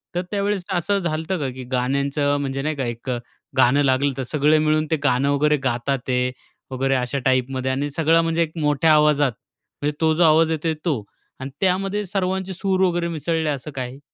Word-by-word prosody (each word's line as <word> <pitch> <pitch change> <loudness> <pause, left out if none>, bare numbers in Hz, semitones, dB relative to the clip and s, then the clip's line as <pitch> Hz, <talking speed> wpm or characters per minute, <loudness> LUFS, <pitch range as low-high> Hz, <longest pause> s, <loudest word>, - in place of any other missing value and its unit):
तर 175 - +1
त्यावेळेस 200 -2 -1
असं 190 +3 +1
झालं 160 -4 -2
होतं 190 +3 -2
का? 140 -3 -2
की 130 0 -8
गाण्यांचं 140 +3 0
म्हणजे 135 -1 -3
नाही 155 +2 -2
का 135 -2 -2
एक, 120 +2 -5 0.5
गाणं 130 +3 +4
लागलं 135 +1 +2
तर 135 - -2
सगळं 150 +4 +2
मिळून 155 0 +2
ते - - +4
गाणं 140 0 +2
वगैरे 150 +1 +3
गातात 130 +1 -1
आहेत 125 0 +1 0.4
वगैरे, 135 +1 0
अशा 125 +2 -1
टाईपमध्ये 130 0 +1
आणि 140 +2 -1
सगळं 165 +3 +3
म्हणजे 165 0 0
एक 160 - -5
मोठ्या 150 +1 +3
आवाजात. 150 -2 +4 0.5
म्हणजे 145 +1 -1
तो 160 -1 +3
जो 170 +3 +2
आवाज 160 0 +5
येतोय, 160 0 -1
तो. 140 -11 0 0.4
आणि 130 +1 -5
त्यामध्ये 195 +2 0
सर्वांचे 190 0 -2
सूर 190 +1 -1
वगैरे 175 -1 0
मिसळले 165 -1 -1
असं 145 +1 -4
काही? 130 0 -5
150 Hz, 190 wpm, -22 LUFS, 135-165 Hz, 0.5 s, आवाज